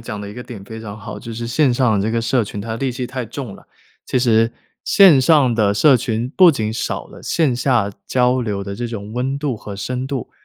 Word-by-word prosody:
讲 105 -2 -6
的 100 - -7
一 - - -9
个 125 - -8
点 115 -6 -10
非 110 +2 -9
常 105 -2 -8
好， 100 - -8
就 115 -2 -8
是 115 +1 -5
线 130 0 +2
上 120 -5 +2
的 100 - 0
这 110 - -1
个 115 - +1
社 120 +1 +1
群 100 0 -6
它 110 +2 -5
戾 135 0 -1
气 125 -1 -4
太 130 -1 -4
重 120 -2 -7
了。 - - -19 0.4
其 130 - 0
实 115 -1 +3 0.3
线 185 -9 +6
上 135 -2 +4
的 105 -3 +2
社 135 +6 +5
群 115 +1 -2
不 185 -2 +8
仅 110 -5 -2
少 115 - -4
了 - - -13
线 155 -7 +1
下 125 -6 +1 0.2
交 125 0 +2
流 105 -4 -3
的 100 0 -6
这 120 - -3
种 110 -2 -7
温 130 +3 -2
度 140 -5 -2
和 105 -1 -8
深 125 +6 -4
度， 135 -4 -5
120 Hz, 265 characters per minute, -19 LUFS, 110-130 Hz, 0.4 s, 不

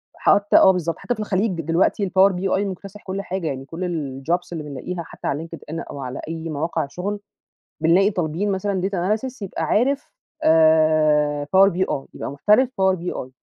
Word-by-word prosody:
حتّى 205 0 +4
آه، 190 - +7
بالضبط 170 -3 -2
حتّى 245 - -2
في - - -14
الخليج 195 -4 -1
دلوقتي 170 +5 +1
الpower 190 +2 +5
BI 190 +1 0
مكتسح 195 +1 -8
كل 195 +1 -4
حاجة 190 -3 -4
يعني، 135 -2 -4
كل 165 +5 -5 0.4
الjobs 175 +5 -1
اللي 160 -2 -4
بنلاقيها 150 +5 -5
حتّى - - -8
على 155 +4 -2
linkedIn 165 -1 -7
أو 140 - -7
على 130 0 -5
أي 165 0 -5
مواقع 155 0 -2
شغل 200 +6 -4 0.6
بنلاقي 190 +6 +4
طالبين 180 +3 -1
مثلًا 195 0 -1
data 200 +3 0
analysis 260 0 -8
يبقى 185 -4 -4
عارف 270 - 0 0.3
آآ، 155 -2 +4
Power 190 +6 +5
BI - - -8 0.4
يبقى - - -5
محترف 210 - +3
Power 190 0 +4
BI 170 -7 -5
180 Hz, 175 wpm, -22 LUFS, 155-195 Hz, 0.6 s, آه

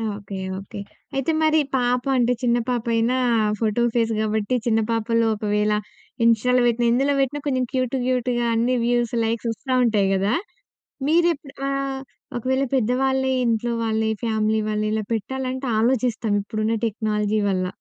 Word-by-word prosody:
Okay, 200 -1 -7 0.2
okay. 195 +1 -9 0.4
అయితే 270 +4 0
మరి 315 0 +4 0.2
పాప 245 -1 +1
అంటే 245 0 +3
చిన్న 240 -1 +2
పాప 240 -2 0
అయినా 230 +3 +2 0.4
ఫోటో 225 +1 +1
ఫేస్ 230 -1 +2
కాబట్టి, 215 +2 0
చిన్న 225 -1 +2
పాపలు 230 0 +1
ఒకవేళ 210 0 0 0.5
ఇంస్టా‌లో 245 +2 +3
పెట్టిన, 240 0 +1
ఎందులో 270 +4 +2
పెట్టినా. 275 +2 0
కొంచెం 260 -2 +1
క్యూట్ 255 -1 -1
క్యూట్‌గా 250 -1 0
అన్ని 240 +3 +2
వ్యూస్ 240 -1 +1
లైక్స్ 225 +1 -1
వస్తా 255 +4 -4
ఉంటాయి 210 -4 +2
కదా! 200 +4 +1 0.8
మీరు 340 +2 +4
ఎప్పుడు 275 -1 -14
ఆహ్, 275 -1 -2 0.4
ఒకవేళ 260 +3 0
పెద్దవాళ్ళే 265 +2 +1
ఇంట్లో 230 +1 0
వాళ్ళే 220 0 0
ఫ్యామిలీ 220 -1 +1
వాళ్ళు 215 0 -1
ఇలా 215 0 -1
పెట్టాలంటే 260 +4 -3
ఆలోచిస్తాం 235 -2 +1
ఇప్పుడున్న 215 +2 -1
టెక్నాలజీ 210 -1 -1
వల్ల. 185 -2 0
235 Hz, 145 wpm, -23 LUFS, 220-255 Hz, 0.8 s, మరి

